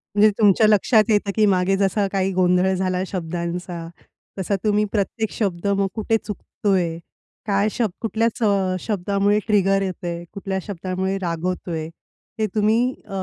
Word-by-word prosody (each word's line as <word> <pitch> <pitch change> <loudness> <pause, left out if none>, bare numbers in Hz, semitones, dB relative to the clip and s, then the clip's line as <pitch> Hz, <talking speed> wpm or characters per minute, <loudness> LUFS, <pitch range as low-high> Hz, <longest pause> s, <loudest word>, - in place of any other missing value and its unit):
म्हणजे 210 +1 +6
तुमच्या 215 0 +5
लक्षात 215 +2 +4
येतं 205 -1 +2
की 215 -1 +4
मागे 190 -1 +2
जसा 200 +1 +1
काही 195 -1 0
गोंधळ 180 +1 +3
झाला 185 0 -1
शब्दांचा, 170 -1 -4 0.5
तसा 195 +2 0
तुम्ही 210 0 +2
प्रत्येक 220 +1 -1
शब्द 195 -3 -2
मग 200 -1 +2
कुठे 225 +1 +1
चुकतोय? 190 -5 -2 0.5
काय 200 0 +2
शब्द 225 -6 -1
कुठल्याच 230 +1 -1
अ, 195 -3 +2
शब्दामुळे 200 +1 +1
ट्रिगर 195 -2 +3
येत 185 -2 -4
आहे? 170 0 -4
कुठल्या 195 -1 -3
शब्दामुळे 190 0 -3
राग 165 -1 -3
होतोय? 170 -3 -3 0.5
हे 215 - +2
तुम्ही 225 +5 +2
अ, - - -23
195 Hz, 150 wpm, -22 LUFS, 185-210 Hz, 0.5 s, म्हणजे